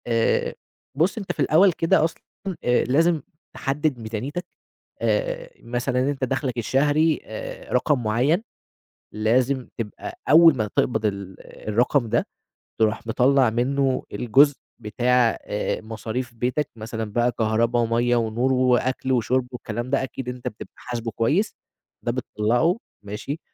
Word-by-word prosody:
آآ 115 -1 +1 0.4
بُص 170 +10 +1
أنت 200 -4 -3
في - - -10
الأول 185 +5 +5
كده 165 -1 +2
أصلًا 165 0 -2 0.4
آآ 125 0 +3
لازم 160 +4 +2 0.3
تحدد 145 -2 -1
ميزانيتك، 115 +10 -4 0.6
آآ - - 0
مثلًا 125 +2 -1
أنت 140 -2 -5
دخلك 130 -1 -1
الشهري، 145 +6 +2
آآ - - -7
رقم 145 -6 +2
معيّن، 130 - +2 0.7
لازم 125 +5 +1
تبقى 120 - -6
أول 165 -2 +8
ما 110 -3 0
تقبض 110 -3 +1
ال 100 -2 -4 0.3
الرقم 120 +3 +2
ده - - +1 0.5
تروح 110 0 +1
مطلع 130 +2 +4
منه 130 +3 0
الجزء 140 +4 +4 0.2
بتاع 120 +2 +2
آآ 105 - -2
مصاريف 115 +3 -5
بيتك، 125 +5 -1
مثلًا 110 -1 -5
بقى 120 +1 +2
كهربا 115 +1 +1
ومَيّة 120 +1 +2
ونور 120 +3 +1
وأكل 130 0 +1
وشرب 125 +1 +1
والكلام 120 0 -5
ده 135 0 +1
أكيد 130 0 -5
أنت 125 0 -6
بتبقى 105 - -8
حاسبه 120 -2 -5
كويس، 150 - +1 0.5
ده - - 0
بتطلّعه، 120 - +1 0.3
ماشي، 105 +9 -5
125 Hz, 135 wpm, -24 LUFS, 115-145 Hz, 0.7 s, أول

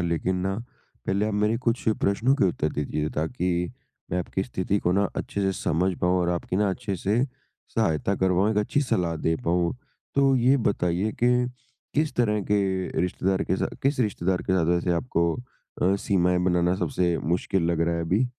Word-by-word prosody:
लेकिन 85 +3 0
ना 95 - 0 0.5
पहले 100 +2 +1
आप 105 - -2
मेरे 105 +2 +2
कुछ 120 -2 0
प्रश्नों 115 +7 +2
के 145 - +2
उत्तर 85 -4 +1
दे 75 - -2
दीजिए 75 +1 -2
ताकि 90 +4 -2 0.6
मैं 90 - 0
आपकी 95 +2 -2
स्थिति 100 -3 -1
को 90 - +1
ना 100 +1 +3
अच्छे 100 - -3
से 95 0 +1
समझ 90 +4 +1
पाऊँ 90 +1 +2
और 85 - 0
आपकी 90 +1 -2
ना 105 0 +2
अच्छे 95 +1 -3
से 105 +7 +1 0.5
सहायता 80 +5 +1
कर 95 0 +2
पाऊँ, 95 +4 +3
एक 110 - -1
अच्छी 105 +7 +1
सलाह 90 - 0
दे 80 +1 0
पाऊँ। 85 0 +1 0.4
तो 135 -1 +4
ये 130 +3 +4
बताइए 95 +2 0
के, 125 0 +4 0.5
किस 150 -1 +1
तरह 105 -3 +2
के 95 -4 +1
रिश्तेदार 95 +2 0
के 95 - 0
सा - - 0 0.2
किस 135 0 +1
रिश्तेदार 95 -5 0
के - - -1
साथ 90 -3 +3
वैसे 90 +1 0
आपको 85 -3 0 0.5
अ, 95 +2 +3
सीमाएँ 90 -2 +2
बनाना 90 -1 +2
सबसे 85 0 0
मुश्किल 90 +3 0
लग 85 - 0
रहा 85 0 +2
है 85 - -1
अभी? 100 +10 +1
95 Hz, 190 wpm, -25 LUFS, 85-105 Hz, 0.6 s, तो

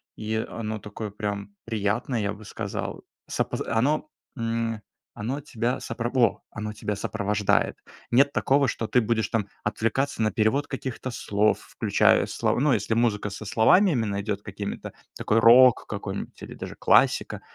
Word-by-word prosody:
и 110 0 -3
оно 110 -1 -4
такое 105 +2 -6
прям 100 -1 -5
приятное, 110 +2 -1
я 100 0 -1
бы 105 +1 -12
сказал. - - -5 0.2
С - - -6
опоз - - -2
оно, 140 +7 +1 0.3
м, 115 -1 -2 0.3
оно 130 +7 -3
тебя 125 -3 -2
сопро 115 +1 -3
Во! 120 -6 +2
Оно 105 -1 -5
тебя 105 -1 -3
сопровождает. 105 0 0 0.3
Нет 140 +4 +4
такого, 140 0 +2
что 115 - -3
ты 125 - +3
будешь 110 0 0
там 105 -3 -1 0.2
отвлекаться 115 +5 -1
на 110 -1 +2
перевод 130 +7 +1
каких-то 130 -1 -5
слов, 105 -3 +1
включая - - +2
слова - - 0
ну, 150 0 +3
если 110 0 0
музыка 110 -3 +1
со 100 +2 -7
словами 175 - +5
именно 110 -7 -1
идёт 100 -1 -3
какими-то, 100 0 -6 0.2
такой 110 - +2
рок 120 +2 +7
какой-нибудь 100 -1 -5
или - - -8
даже - - -7
классика, - - +3
110 Hz, 155 wpm, -26 LUFS, 105-120 Hz, 0.3 s, рок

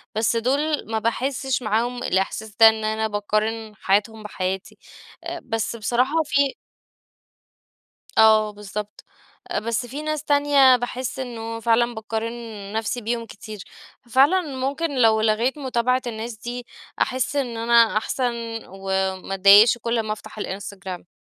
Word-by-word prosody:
بس 225 +2 +1
دول 285 +6 0
ما 220 - 0
باحسش 260 +3 -1
معاهم 240 +3 -1
الإحساس 205 +2 -1
ده 225 -1 +9
إن 220 0 -3
أنا 220 0 0
باقارن 215 +1 -2
حياتهم 215 +2 0
بحياتي، 190 -1 -4 0.7
بس 225 0 -2
بصراحة 250 +8 +1
في 280 -1 +2 1.7
آه 220 -1 +6
بالضبط، 210 0 -7 0.6
بس 230 +2 -2
في 280 +5 -6
ناس 305 -1 -3
تانية 285 -3 +5
باحس 245 +1 -4
إنه 230 -3 -5
فعلًا 235 +1 +2
باقارن 220 +1 -4 0.4
نفسي 225 +3 -2
بيهم 230 +1 -3
كتير، 210 -2 -10 0.4
ففعلًا 270 +10 +4 0.2
ممكن 280 +2 -2
لو 220 -1 +5
لغيت 225 +6 +1
متابعة 255 -1 0
الناس 225 0 -5
دي 240 +2 -6 0.3
أحس 260 +2 0
إن 245 -5 -1
أنا 230 -1 +4
أحسن، 245 +3 0 0.4
وما 190 0 -2
أتضايقش 200 +5 +7
كل 230 0 -1
ما 215 -1 -3
أفتح 215 - -9
الإنستجرام. 190 -3 -6
225 Hz, 125 wpm, -23 LUFS, 215-255 Hz, 1.7 s, ده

